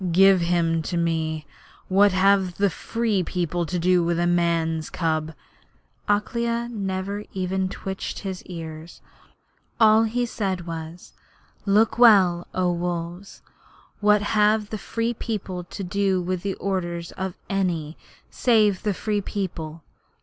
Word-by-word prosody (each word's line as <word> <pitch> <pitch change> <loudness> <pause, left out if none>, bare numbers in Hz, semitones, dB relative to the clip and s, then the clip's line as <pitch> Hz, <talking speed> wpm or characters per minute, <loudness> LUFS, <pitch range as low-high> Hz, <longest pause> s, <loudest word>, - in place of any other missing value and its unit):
Give 190 +1 +6
him 170 -1 +1
to 170 +2 -3
me. 160 -2 -1 0.4
What 200 +2 +5
have 190 -1 +3
the 200 -1 +2
Free 225 +3 -1
People 175 -1 -2
to 180 - -2
do 180 0 +3
with 170 0 0
a 175 - +1
man's 170 -2 +1
cub?' 160 -2 -1 0.7
Akela 235 +3 0
never 200 -1 -3
even 190 0 -1
twitched 190 0 -5
his 190 -2 -5
ears: 165 -1 -8 0.8
all 220 0 +6
he 240 +2 0
said 190 -6 -3
was: 165 +1 -7 0.5
'Look 215 +4 +3
well, 190 -7 +6
O 180 -1 +2
Wolves! 175 +2 -4 0.6
What 210 0 +4
have 210 0 +2
the 215 - -3
Free 230 +4 -2
People 195 -6 -4
to 195 - -7
do 190 0 +1
with 180 0 -2
the 195 0 -2
orders 175 -3 -3
of 190 -1 -5
any 170 -6 -1 0.4
save 215 -6 +3
the 210 -3 -1
Free 210 +1 -1
People? 165 -6 -5
185 Hz, 135 wpm, -24 LUFS, 170-205 Hz, 0.8 s, Give